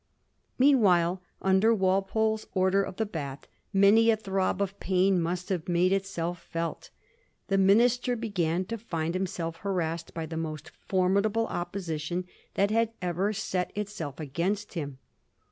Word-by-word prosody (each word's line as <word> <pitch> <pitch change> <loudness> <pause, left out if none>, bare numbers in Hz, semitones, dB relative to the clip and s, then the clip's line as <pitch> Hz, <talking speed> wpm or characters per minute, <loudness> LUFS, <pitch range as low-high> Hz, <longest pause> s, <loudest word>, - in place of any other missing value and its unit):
Meanwhile, 190 -10 +4 0.2
under 195 +4 +4
Walpole's 195 +3 +1
Order 190 +1 +3
of 190 - -4
the 220 - 0
Bath, 140 -8 -6 0.2
many 210 +3 +5
a 225 - +5
throb 195 -3 -1
of 200 0 -2
pain 185 -1 +2
must 180 +3 -2
have 180 -3 -2
made 175 +2 +3
itself 175 -3 -2
felt. 165 0 -4 0.6
The 195 0 +3
minister 240 +6 +4
began 185 -6 -1
to 230 +3 -5
find 165 -6 -3
himself 175 -3 -3
harassed 170 -4 -3
by 165 -1 -3
the 160 0 -6
most 155 -2 -5 0.2
formidable 200 +4 +2
opposition 175 -2 -3 0.3
that 200 +1 +2
had 225 0 +1
ever 180 +3 0
set 190 -4 -2
itself 200 -9 -4
against 175 +8 -2
him. 145 -6 -4
190 Hz, 140 wpm, -28 LUFS, 170-205 Hz, 0.6 s, many